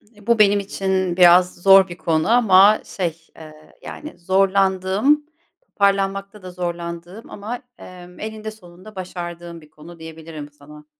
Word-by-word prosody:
E, 205 0 -19
bu 235 -1 +2
benim 205 -1 +4
için 190 -2 -2
biraz 180 0 +5
zor 195 +1 +5
bir 175 -1 -10
konu 160 +1 -1
ama 210 -3 +5
şey, 170 -4 -4 0.2
ııı, 155 -1 -15
yani 300 - -10
zorlandığım, 195 +8 +1 0.4
toparlanmakta 195 0 -1
da 185 - -9
zorlandığım 175 +2 -7
ama, 220 +4 -7 0.2
emm, 180 -1 -13
eninde 215 0 -7
sonunda 185 0 -16
başardığım 175 -2 -8
bir 150 - -19
konu 165 +3 -15
diyebilirim 160 -2 -10
sana. 150 +1 -16
185 Hz, 135 wpm, -20 LUFS, 170-200 Hz, 0.4 s, biraz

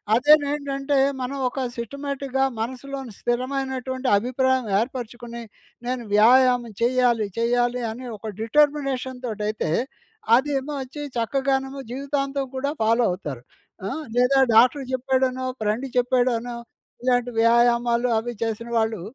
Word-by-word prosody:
అదేనేంటంటే, 285 0 +2 0.2
మనం 270 +2 -3
ఒక 270 - -6 0.2
సిస్టమాటిక్‌గా 270 +2 -3 0.2
మనసులోని 260 0 -5
స్థిరమైనటువంటి 260 +1 -2
అభిప్రాయం 255 +2 +1
ఏర్పరుచుకుని, 240 -1 -5 0.5
నేను 250 -1 -2
వ్యాయామం 245 +1 +5
చెయ్యాలి, 240 -3 +2
చెయ్యాలి 245 +1 +1
అని 250 +3 -8
ఒక 220 +2 -7
డిటర్మినేషన్‌తోటయితే, 255 - 0 0.6
అదేమో 280 +2 0
ఒచ్చి 285 +3 -9 0.2
చక్కగానేమో 270 +3 -1
జీవితాంతం 275 0 -2
కూడా 280 +2 -1
ఫాలో 230 +2 +3
అవుతారు. 140 -8 -6 0.4
ఆ! - - -2 0.3
లేదా 260 +2 +4 0.2
డాక్టర్ 255 +4 +5
చెప్పాడనో, 260 0 0 0.2
ఫ్రెండు 215 +6 -1
చెప్పాడనో, 245 -1 +1 0.5
ఇలాంటి 245 -1 +1
వ్యాయామాలు 235 +1 +3
అవి 240 +2 -5
చేసిన 230 +1 -3
వాళ్ళు, 220 -4 0
255 Hz, 105 wpm, -23 LUFS, 235-270 Hz, 0.6 s, వ్యాయామం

